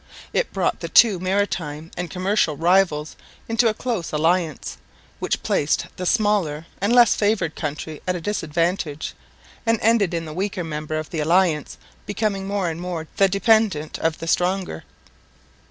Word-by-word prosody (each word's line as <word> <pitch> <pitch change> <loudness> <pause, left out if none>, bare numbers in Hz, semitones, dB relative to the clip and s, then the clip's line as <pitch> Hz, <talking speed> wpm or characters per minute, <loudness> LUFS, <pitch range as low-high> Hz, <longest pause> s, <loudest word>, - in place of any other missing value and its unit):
It - - 0
brought - - 0
the - - -5
two 210 -6 +6
maritime 175 -5 -2
and 180 -1 -4
commercial 185 -4 0
rivals 170 -2 +2 0.3
into 230 +1 +3
a 220 - +2
close 225 -10 -3
alliance, 160 0 0 0.4
which - - -2
placed 145 - +1
the 180 - -3
smaller 200 -9 +1 0.2
and 200 +3 +1
less 240 -2 +6
favoured 205 -6 0
country 150 0 -5
at 180 - +1
a - - -3
disadvantage, 165 -3 -2 0.5
and 230 0 +2
ended 215 -6 +2
in 165 0 -3
the 155 - -7
weaker 190 +1 -2
member 155 -1 -4
of 155 0 -5
the 165 - -3
alliance 165 -1 +2 0.3
becoming 200 -2 -1
more 200 -2 -1
and 165 0 -4
more 175 -3 -4
the 195 - +5
dependent 200 -6 +2
of 160 -1 0
the - - -6
stronger. 180 - 0
180 Hz, 155 wpm, -22 LUFS, 160-205 Hz, 0.5 s, two